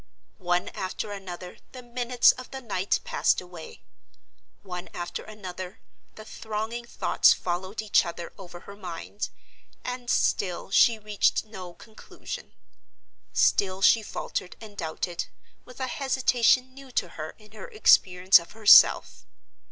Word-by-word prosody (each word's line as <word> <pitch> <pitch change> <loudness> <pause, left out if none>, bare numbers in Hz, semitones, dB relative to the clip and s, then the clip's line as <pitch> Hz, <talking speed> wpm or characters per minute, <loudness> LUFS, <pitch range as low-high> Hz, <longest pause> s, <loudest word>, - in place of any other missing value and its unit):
One 175 -1 0
after 190 +2 -5
another 180 -3 -8
the 255 -1 -9
minutes 245 0 +3
of 255 0 -10
the 265 - -7
night 200 -6 -1
passed - - +1
away; 175 -3 -11 0.8
one 180 -2 -7
after 175 0 -5
another 185 -2 -8 0.4
the 215 - -11
thronging 220 +2 -5
thoughts - - +3
followed 185 +5 -4
each 210 - +4
other 170 0 -7
over 175 -3 -11
her 200 - -11
mind—and 210 +6 -8
still 185 -5 0
she 230 +2 +5
reached 210 0 0
no 185 -5 -10
conclusion; 220 -2 -10 0.8
still 195 - +2
she 225 +2 +6
faltered 185 -3 -5
and 215 -2 -12
doubted, 170 0 -4 0.4
with 250 - -14
a 260 - -1
hesitation 260 -3 +2
new 275 0 -13
to 180 - 0
her 155 -1 -8
in 215 -1 -19
her 215 - -10
experience 185 - +5
of 170 - -13
herself. 215 -1 +6
205 Hz, 130 wpm, -26 LUFS, 180-235 Hz, 0.8 s, she